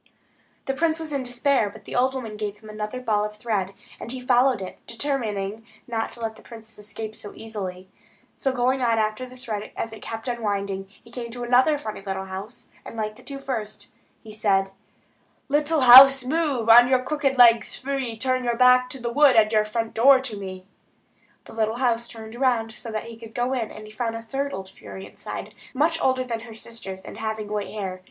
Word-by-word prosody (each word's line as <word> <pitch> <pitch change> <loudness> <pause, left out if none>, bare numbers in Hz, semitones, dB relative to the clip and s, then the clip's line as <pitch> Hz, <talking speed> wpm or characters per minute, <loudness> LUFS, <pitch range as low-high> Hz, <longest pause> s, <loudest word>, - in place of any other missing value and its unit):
The 270 - -1
prince 320 +3 0
was 315 -2 -5
in 280 - 0
despair; 245 -2 +1
but - - -14
the - - -7
old 260 +2 +2
woman 225 -5 -5
gave 210 -1 -4
him 215 0 -14
another 215 +3 -5
ball 215 -4 +1
of 210 0 -4
thread, 210 -4 -2 0.3
and 235 - -6
he 260 - -4
again 250 0 -10
followed 250 -1 +4
it, 190 -1 -8
determining 225 -5 -3 0.2
not 225 -2 -2
to 235 - -11
let 220 -1 -3
the - - -15
princess 225 -2 -13
escape 215 +1 -7
again - - -11
so 205 - -9
easily. 190 -4 -6 0.5
So 270 - -1
going 255 +1 +1
on 230 -2 +2
after 215 +3 -1
the 255 - -13
thread, 220 -5 -5
as 225 - -3
it 220 - -10
kept 225 +1 -6
unwinding, 200 -5 -2
he 205 +4 -21
came 235 -1 -6
to 245 +1 -6
a 255 +5 +4
funny 215 -8 -6
little 190 -1 -4
house, 190 +5 -8 0.2
like 215 -1 -4
the - - -16
two 275 - -7
first, 240 -6 -5 0.4
and 215 - -9
said: 195 -2 +1 0.8
"Little 300 +2 +2
house, 260 +1 +10
move 280 -5 0
On 240 +2 +9
your 255 0 +2
crooked 280 -2 0
legs 235 -2 +6
free; 260 -4 -3
Turn 255 +2 0
your 240 -1 0
back 250 0 +5
to 265 - -4
the 235 -1 -3
wood, 290 -1 +6
And 215 -1 +5
your 215 -1 +3
front 225 +1 -3
door 265 +4 +6
to 255 -5 -3
me." 190 -2 -7 0.8
The - - -12
little 220 0 0
house 235 -2 +1
turned 220 -2 -10
round, 240 -3 +1
so 230 0 -9
that 215 -1 -3
he 230 -1 -9
could 225 0 -12
go 245 +2 0
in, 235 -4 -2
and 215 - -10
he 215 - -12
found 225 +1 -3
a 230 - -6
third 275 +4 -3
old 190 -5 -6
fury 190 0 -10
inside; - - -8 0.2
much 325 +4 +2
older 260 -1 +2
than 235 -3 -3
her 225 -1 -11
sisters, 220 -5 -8
and - - -10
having 220 -1 -3
white 210 -1 -3
hair. 190 -3 -5
230 Hz, 215 wpm, -24 LUFS, 215-255 Hz, 0.8 s, house